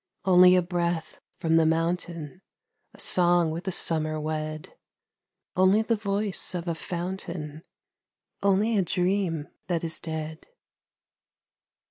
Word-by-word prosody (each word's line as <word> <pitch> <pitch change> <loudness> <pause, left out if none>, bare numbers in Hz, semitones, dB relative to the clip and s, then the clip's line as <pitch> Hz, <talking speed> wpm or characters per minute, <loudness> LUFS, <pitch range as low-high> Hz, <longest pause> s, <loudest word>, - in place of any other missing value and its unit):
Only 180 -1 +7
a 180 - +3
breath 170 -2 -2 0.2
from 165 0 +2
the 165 - +4
mountain, 165 0 -2 0.5
A - - -17
song 175 -2 +4
with 170 +4 -5
the 190 - -1
summer 155 -3 +1
wed; 155 0 -4 0.8
Only 190 +4 +4
the 230 +1 +1
voice 200 -2 0
of 175 0 -4
a 170 - 0
fountain, 170 -3 -5 0.8
Only 200 +3 +2
a 200 - +3
dream 180 -3 -1 0.2
that 170 -2 -1
is 165 -1 -1
dead. 160 -1 -6
175 Hz, 120 wpm, -26 LUFS, 160-185 Hz, 0.8 s, Only